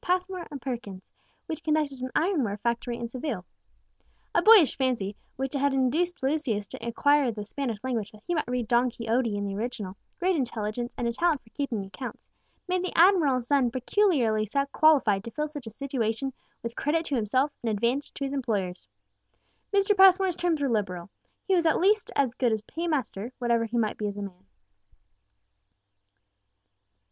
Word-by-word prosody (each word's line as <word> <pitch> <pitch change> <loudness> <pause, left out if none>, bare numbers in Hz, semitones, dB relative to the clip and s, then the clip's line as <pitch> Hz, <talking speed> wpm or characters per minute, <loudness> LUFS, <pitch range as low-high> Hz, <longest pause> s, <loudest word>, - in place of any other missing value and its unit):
Passmore 365 -1 -1
and 285 - -7
Perkins, 230 -7 -5 0.4
which 320 0 -5
conducted 305 -4 0
an 255 - -3
ironware 300 - +1
factory 235 +2 -2
in 235 - -4
Seville. 240 - -4 0.9
A - - +4
boyish 425 - +7
fancy, 240 -7 -1 0.2
which 270 +1 -3
had 280 -1 +1
induced 305 +6 +1
Lucius 265 -7 0
to - - -9
acquire 285 +4 +3
the 210 -2 -5
Spanish 240 0 -3
language 235 -5 -2
that 215 0 -17
he 350 - -1
might 310 - -1
read 245 -2 -2
Don 240 +1 +3
Quixote 230 -1 -1
in 205 - -2
the 200 - -3
original, 210 -3 -4 0.2
great 370 0 +1
intelligence, 240 -3 -2
and 240 - -1
a 235 - -1
talent 320 0 +1
for 225 - -23
keeping 235 -9 -3
accounts, 195 +7 -8 0.4
made 365 0 0
the 370 - -4
admiral's 320 -9 +5
son 270 -2 +3
peculiarly 245 - +1 0.2
qualified 260 -11 +4
to 230 - -6
fill 300 +5 -2
such 290 -5 -8
a - - -3
situation 260 0 -2 0.3
with 235 0 -5
credit 325 +3 0
to 285 - -1
himself 255 +5 +1
and 235 - -1
advantage 235 +7 0
to - - -4
his 275 0 -2
employers. 205 -9 -2 0.8
Mr. 400 0 +3
Passmore's 380 -1 +6
terms 340 -4 0
were - - +2
liberal: 195 -6 -2 0.4
he 385 - +2
was 340 -3 +3
at 320 - +3
least 410 +2 +3 0.3
good 245 -3 +3
as 220 -1 0
a - - -43
paymaster, 265 - -3
whatever 235 -2 +1
he 230 +2 -3
might 220 -2 0
be 210 - -1
as 205 0 -5
a 205 - -4
man. 180 - -10
255 Hz, 175 wpm, -27 LUFS, 225-310 Hz, 0.9 s, boyish